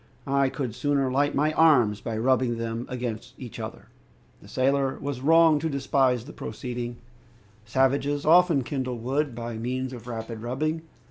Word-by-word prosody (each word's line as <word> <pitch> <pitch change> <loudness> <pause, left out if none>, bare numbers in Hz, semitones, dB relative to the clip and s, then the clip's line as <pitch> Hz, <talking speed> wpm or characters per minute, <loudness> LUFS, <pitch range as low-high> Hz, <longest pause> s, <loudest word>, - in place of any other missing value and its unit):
"I 140 -1 +2
could 130 -4 -4
sooner 140 -1 0
light 145 +2 +1
my 150 +2 +2
arms 125 -11 +4
by 115 -2 -3
rubbing 125 0 +2
them 115 +1 -4
against 120 -1 -5
each 125 -5 -9
other!" - - -7 0.5
The - - -15
sailor 135 +1 +1
was 140 -3 -4
wrong 160 +1 +5
to 160 +2 -2
despise 135 -3 +1
the 150 - -10
proceeding. 120 +2 -5 0.7
Savages 140 +4 +1
often 165 -3 +5
kindle 130 -1 -3
wood 135 +3 -1
by 115 -1 -5
means 130 +2 -3
of 120 -1 -9
rapid 115 -1 -6
rubbing. 155 +7 -2
130 Hz, 155 wpm, -26 LUFS, 120-145 Hz, 0.7 s, wrong